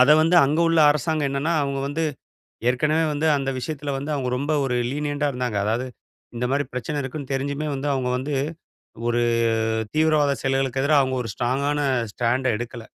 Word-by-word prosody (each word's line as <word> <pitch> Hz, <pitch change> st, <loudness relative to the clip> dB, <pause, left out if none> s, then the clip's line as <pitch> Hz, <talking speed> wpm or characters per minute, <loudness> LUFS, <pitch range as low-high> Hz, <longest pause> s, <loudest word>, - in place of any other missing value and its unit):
அத 130 Hz, +4 st, +6 dB
வந்து 165 Hz, +2 st, +3 dB
அங்க 145 Hz, +3 st, +1 dB
உள்ள 165 Hz, -1 st, +3 dB
அரசாங்கம் 150 Hz, 0 st, 0 dB
என்னனா, 140 Hz, +4 st, 0 dB
அவங்க 140 Hz, -1 st, -2 dB
வந்து 155 Hz, +3 st, -1 dB, 0.7 s
ஏற்கனவே 150 Hz, +6 st, +2 dB
வந்து 150 Hz, +2 st, 0 dB
அந்த 135 Hz, -1 st, -2 dB
விஷயத்தில 145 Hz, +1 st, -4 dB
வந்து, 145 Hz, +3 st, -4 dB
அவங்க 130 Hz, -3 st, -2 dB
ரொம்ப 145 Hz, +3 st, -2 dB
ஒரு 130 Hz, -2 st, -1 dB, 0.2 s
லீனியன்ட்டா 145 Hz, 0 st, -1 dB
இருந்தாங்க. 125 Hz, -4 st, -2 dB
அதாவது, 115 Hz, +5 st, 0 dB, 0.5 s
இந்த 120 Hz, -, -1 dB
மாரி 140 Hz, +1 st, +1 dB
பிரச்சன 145 Hz, +4 st, -3 dB
இருக்குனு 135 Hz, +1 st, -6 dB
தெரிஞ்சுமே 140 Hz, +3 st, -2 dB
வந்து 135 Hz, +2 st, -3 dB
அவங்க 130 Hz, -2 st, -1 dB
வந்து, 140 Hz, +3 st, -3 dB, 0.7 s
ஒரு 120 Hz, 0 st, +1 dB, 0.7 s
தீவிரவாத 155 Hz, -2 st, +3 dB
செயல்களுக்கு 135 Hz, -1 st, 0 dB
எதிரா 145 Hz, +2 st, +3 dB
அவங்க 130 Hz, -1 st, -1 dB
ஒரு 115 Hz, -, -5 dB
ஸ்ட்ராங்கான 140 Hz, +4 st, 0 dB, 0.3 s
ஸ்டாண்ட்ட 125 Hz, +3 st, 0 dB
எடுக்கல. 120 Hz, 0 st, -6 dB
140 Hz, 165 wpm, -23 LUFS, 130-150 Hz, 0.7 s, அத